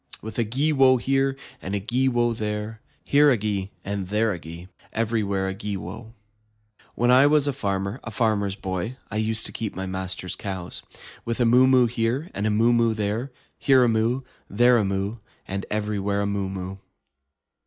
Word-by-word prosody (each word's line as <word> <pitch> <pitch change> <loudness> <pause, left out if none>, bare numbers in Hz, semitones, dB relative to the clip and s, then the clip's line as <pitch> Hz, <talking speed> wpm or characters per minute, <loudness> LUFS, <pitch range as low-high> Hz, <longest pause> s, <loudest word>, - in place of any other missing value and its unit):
With 110 +1 -5
a - - +3
gee 135 +8 0
wo 135 -2 +5
here, 135 +2 +1 0.2
and 95 +2 -3
a - - 0
gee 120 +6 0
wo 120 -1 +1
there. 105 0 -4 0.2
Here 145 +1 +5
a 130 - +4
gee, 100 -2 -2 0.2
and 100 -1 -3
there 105 +3 +1
a 90 - -6
gee, 85 +1 -9
And 90 - -14 0.2
everywhere 105 -4 0
a 95 - -2
gee 100 0 -4
wo. 110 +6 -9 0.8
When 120 +1 +3
I 130 +3 +7
was 150 -1 +4
a 140 - +1
farmer, 100 -2 -2
a - - -6
Farmer's 105 -4 0
Boy, 95 +5 -4
I 110 - -2
used 110 0 0
to - - -3
keep 110 -3 -4
my 95 - -4
master's 95 -1 -4
cows. 95 -3 -5 0.4
With 115 +1 -3
a 120 - +4
moo 125 +3 +6
moo 130 -1 +5
here, 120 +7 -1
and 105 +2 -1
a - - +2
moo 115 +3 +3
moo 115 -1 +3
there, 110 +5 -2 0.3
Here 130 -2 +5
a - - +4
moo, 115 +3 +1 0.3
and 100 - -10
there 120 0 +6
a - - +2
moo, 100 +3 -2 0.3
And 95 0 -4
everywhere 105 -1 -1
a - - 0
moo 100 -1 -1
moo. 95 0 -5
110 Hz, 200 wpm, -24 LUFS, 100-120 Hz, 0.8 s, I